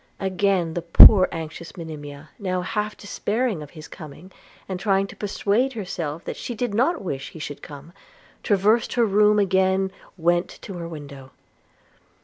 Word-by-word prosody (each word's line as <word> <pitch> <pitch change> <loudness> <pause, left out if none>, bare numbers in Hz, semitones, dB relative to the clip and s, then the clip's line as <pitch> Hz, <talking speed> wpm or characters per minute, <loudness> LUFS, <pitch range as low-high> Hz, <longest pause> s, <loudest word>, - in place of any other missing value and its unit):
Again 190 -3 0
the 175 - -3
poor 185 +3 +8
anxious 165 +1 -7
Monimia, 150 -3 -9
now 185 -3 -2
half 210 +3 -3
despairing 210 -1 -2
of 150 - -9
his 155 - -9
coming, 155 +4 -11 0.4
and 185 -1 -4
trying 195 0 +1
to - - -11
persuade 210 +5 0
herself 170 -7 -5
that - - -5
she 240 - -5
did 240 -1 -2
not 285 - +1
wish 135 -7 -4
he - - -12
should 145 -2 -7
come, 145 +3 -11 0.5
traversed 210 +2 +2
her 240 -2 +3
room, 210 0 +4
again 190 -1 +2 0.3
went 175 +1 +1 0.2
to 195 - -7
her 170 - -5
window. 140 -4 -10
185 Hz, 155 wpm, -23 LUFS, 160-205 Hz, 0.5 s, poor